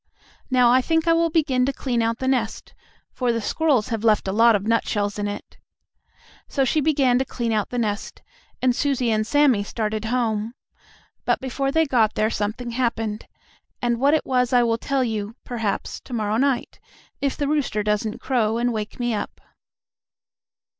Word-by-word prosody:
Now 250 -2 +4
I 255 +1 +5
think 325 +4 0
I 330 - +5
will 335 0 +2
begin 290 -6 +1
to - - +1
clean 250 -3 -1
out 230 0 0
the 260 - -3
nest, 245 -4 -1 0.4
for 250 -2 0
the 230 - -1
squirrels 260 0 +1
have 225 -2 -3
left 215 -3 +3
a - - 0
lot 225 +2 +5
of 200 0 -2
nutshells 210 -2 0
in 205 - -1
it." 205 - -8 0.9
So 270 -2 0
she 305 +4 +1
began 275 -4 +3
to - - +2
clean 240 -2 -3
out 210 -2 0
the 245 - -4
nest, 210 -3 -3 0.4
and 250 -1 +3
Susie 265 -4 0
and 215 0 0
Sammie 275 -6 +3
started 215 0 -3
home. 225 -1 -1 0.7
But, - - +1
before 270 +1 -2
they 320 +2 +3
got 235 -6 +2
there 215 +1 +1
something 220 +4 -3
happened, 225 -3 -2 0.5
and 240 -1 0
what 285 +4 +4
it 310 - -1
was 250 -1 +1
I 245 -1 +5
will 230 -1 +1
tell 275 +1 0
you, 220 -2 -3
perhaps, 225 -5 -3
to 255 - -11
morrow 215 -2 0
night, 270 0 0 0.4
if 275 -1 -1
the 285 - -1
rooster 275 -8 0
doesn't 210 +2 -1
crow 230 -4 0
and 240 0 0
wake 215 +1 -5
me 240 -1 0
up. 210 - -4
240 Hz, 185 wpm, -23 LUFS, 215-265 Hz, 0.9 s, I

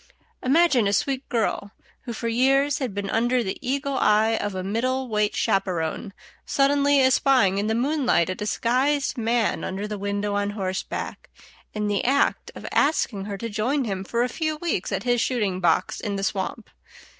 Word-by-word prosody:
Imagine 270 -5 +3
a 200 - 0
sweet 270 +5 -1
girl, 220 -3 -1 0.3
who 240 - -4
for 230 +1 -4
years 270 +4 +2
had 260 -5 -2
been 200 0 -4
under 240 +2 +1
the 190 - -4
eagle 275 +1 -1
eye 215 +2 +3
of 205 -3 -3
a 185 - -3
middle 255 +6 -1
weight 210 -2 0
chaperon, 185 +1 -1 0.3
suddenly 280 0 +3
espying 260 -7 +3
in 205 - -1
the 220 - 0
moonlight 250 - +1
a 185 - -1
disguised 255 +8 0
man 230 -2 0
under 195 +2 -4
the 210 -1 -5
window 200 +1 -2
on 205 0 0
horseback, 185 -1 -4 0.5
in 210 0 -1
the 205 -1 0
act 275 +3 +1
of - - -9
asking 230 -9 +1
her 200 -1 -5
to 230 - -4
join 240 +7 0
him 195 -3 -3
for 235 +5 0
a - - +1
few 310 +4 -2
weeks 305 - -2
at - - -2
his 245 -1 +1
shooting 210 -8 0
box 170 -3 +1
in 205 -1 -3
the 195 - -3
swamp. 195 +3 -3
230 Hz, 180 wpm, -24 LUFS, 200-265 Hz, 0.5 s, Imagine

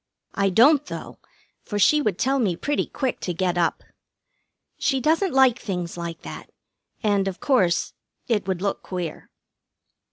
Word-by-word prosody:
I 200 -1 +1
don't, 275 - +5
though, - - -8 0.4
for 205 - -4
she 300 +9 +4
would 210 -10 0
tell 270 +4 +1
me 200 -8 +1
pretty 290 +10 -1
quick 260 -2 -2
to 180 - -3
get 180 0 0
up. 170 -2 0 1.0
She 270 -2 +1
doesn't 325 +7 +2
like 265 -2 +4
things 180 -5 -4
like 170 -1 -6
that, - - -9 0.5
and, 200 -2 +2
of 190 -1 -4
course, 190 -11 +2 0.3
it 210 -5 0
would 190 -1 -2
look 200 - -1
queer. 175 -4 -6
200 Hz, 155 wpm, -24 LUFS, 180-265 Hz, 1.0 s, don't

